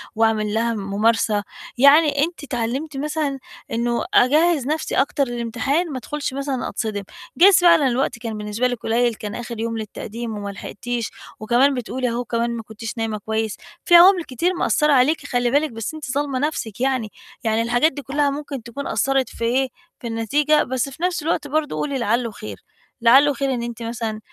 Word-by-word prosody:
وأعمل 220 -2 +1
لها 230 +1 +1
مُمارسة. 210 +1 +1 0.3
يعني 285 +2 +5
أنتِ 335 -2 -9
أتعلمتِ 265 +4 -3
مثلًا 290 -1 -2 0.3
إنه 235 +1 -1
أجهّز 300 +1 +4
نَفْسي 310 +1 -2
أكتر 280 +1 +2
للإمتحان 245 +8 -1
ما 260 - -4
أدخُلش 295 +1 -4
مثلًا 275 -1 -3
أتصدم، 215 -3 -3 0.3
جايز 380 +2 +7
فعلًا 335 -5 +5
الوقت 250 0 0
كان 225 -2 -5
بالنسبة 210 +4 -1
لِك 245 -2 -3
قليل 235 +1 +2
كان 210 -1 -6
آخِر 235 -1 -6
يوم 230 0 -2
للتقديم 220 +1 -6
وما 205 -1 -5
لحقتيش، 230 +4 -5 0.3
وكمان 245 +6 +3
بتقولي 250 0 -2
أهو 240 +1 -3
كمان 235 +1 -1
ما - - -7
كنتش 220 +1 -7
نايمة 225 -1 -2
كويس، 220 +1 -3 0.3
في 345 - +6
عوامل 360 0 +8
كتير 330 +8 -1
مقصّرة 300 -3 +2
عليكِ 285 +3 +3
خلّي 245 -2 0
بالِك 295 +1 +2
بس 225 +4 -5
أنتِ 305 -5 -6
ظالمة 280 -1 -1
نَفْسك 250 -7 -3
يعني، 255 -5 0 0.3
يعني 220 -1 +1
الحاجات 240 +7 +2
دي 285 - -7
كلّها 285 +1 0
ممكن 280 -3 -5
تكون 260 +4 -6
أثّرت 270 -1 +1
في - - -7
إيه، 260 +3 +2 0.3
في 240 - -6
النتيجة 285 +7 +2
بس 260 +1 -2
في 295 +6 -10
نَفْس 360 -3 0
الوقت 305 -2 -1
برضه 300 +1 -1
قولي 280 -2 -2
لعلّه 235 0 0
خير، 215 - -8 0.4
لعلّه 270 +5 +6
خير 275 -1 -1
إن 235 -1 -3
أنتِ 235 0 -6
مثلًا 225 -2 -4
250 Hz, 180 wpm, -21 LUFS, 225-285 Hz, 0.4 s, عوامل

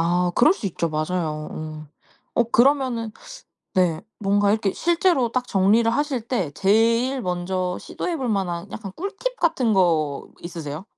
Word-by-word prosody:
아 175 +2 +2
그럴 320 - +6
수 215 - -5
있죠. 170 -2 -2
맞아요. 155 -1 -2
응. 155 -1 -7 0.5
어 240 - +3
그러면은 240 -2 +2 0.6
네. 175 -4 +1 0.2
뭔가 200 0 +2
이렇게 210 -2 +1
실제로 335 -8 +2
딱 250 -1 -1
정리를 210 +4 +3
하실 280 +1 0
때 220 - -2
제일 230 - +2
먼저 180 0 -2
시도해 340 -3 -4
볼 260 -2 -2
만한 190 -3 -2
약간 195 -4 -7
꿀팁 405 +7 -4
같은 255 -9 +2
거 160 -7 +1
있으세요? 165 -1 -6
200 Hz, 285 characters per minute, -23 LUFS, 175-250 Hz, 0.6 s, 그럴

